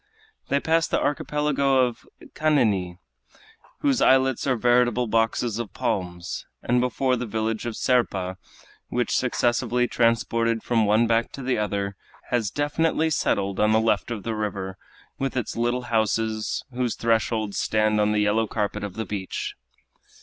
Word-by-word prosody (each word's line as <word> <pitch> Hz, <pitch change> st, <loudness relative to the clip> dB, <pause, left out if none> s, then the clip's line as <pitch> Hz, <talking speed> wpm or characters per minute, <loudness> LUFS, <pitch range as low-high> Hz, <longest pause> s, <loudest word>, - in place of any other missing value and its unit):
They 140 Hz, -, +2 dB
passed 165 Hz, +1 st, +1 dB
the -, -, +1 dB
archipelago 140 Hz, -2 st, +1 dB
of 120 Hz, -2 st, -6 dB, 0.3 s
Caniny, 110 Hz, -, +1 dB, 0.8 s
whose 280 Hz, -4 st, +2 dB
islets 130 Hz, 0 st, +3 dB
are 130 Hz, -, +3 dB
veritable 120 Hz, 0 st, +3 dB
boxes 115 Hz, 0 st, 0 dB
of 115 Hz, -4 st, -6 dB
palms, 90 Hz, -3 st, -3 dB, 0.2 s
and 125 Hz, +1 st, +2 dB
before 125 Hz, +1 st, +1 dB
the 125 Hz, 0 st, -4 dB
village 110 Hz, +2 st, -2 dB
of 115 Hz, -, -4 dB
Serpa, 95 Hz, -7 st, 0 dB, 0.5 s
which, -, -, 0 dB
successively 120 Hz, +1 st, +1 dB
transported 115 Hz, -1 st, +1 dB
from 115 Hz, -3 st, +2 dB
one 110 Hz, +3 st, +4 dB
back 115 Hz, 0 st, +1 dB
to 135 Hz, -, -7 dB
the 125 Hz, -3 st, 0 dB
other, 100 Hz, -1 st, -2 dB, 0.3 s
has 120 Hz, -4 st, +1 dB
definitely 160 Hz, +4 st, 0 dB
settled 100 Hz, -8 st, 0 dB
on 105 Hz, +1 st, +3 dB
the 110 Hz, -, +5 dB
left 110 Hz, +1 st, +1 dB
of 110 Hz, -5 st, -4 dB
the 115 Hz, -, -2 dB
river, 100 Hz, -3 st, -3 dB, 0.4 s
with 135 Hz, -1 st, -2 dB
its 120 Hz, -, -2 dB
little 120 Hz, +2 st, 0 dB
houses, 110 Hz, -1 st, 0 dB
whose 125 Hz, -2 st, -1 dB
thresholds 110 Hz, -2 st, 0 dB
stand 110 Hz, 0 st, +2 dB
on 105 Hz, 0 st, +2 dB
the 105 Hz, 0 st, +2 dB
yellow 105 Hz, +2 st, +2 dB
carpet 105 Hz, -1 st, -2 dB
of 100 Hz, -3 st, -5 dB
the 110 Hz, -, -3 dB
beach. 100 Hz, -2 st, -4 dB
115 Hz, 150 wpm, -24 LUFS, 105-125 Hz, 0.8 s, the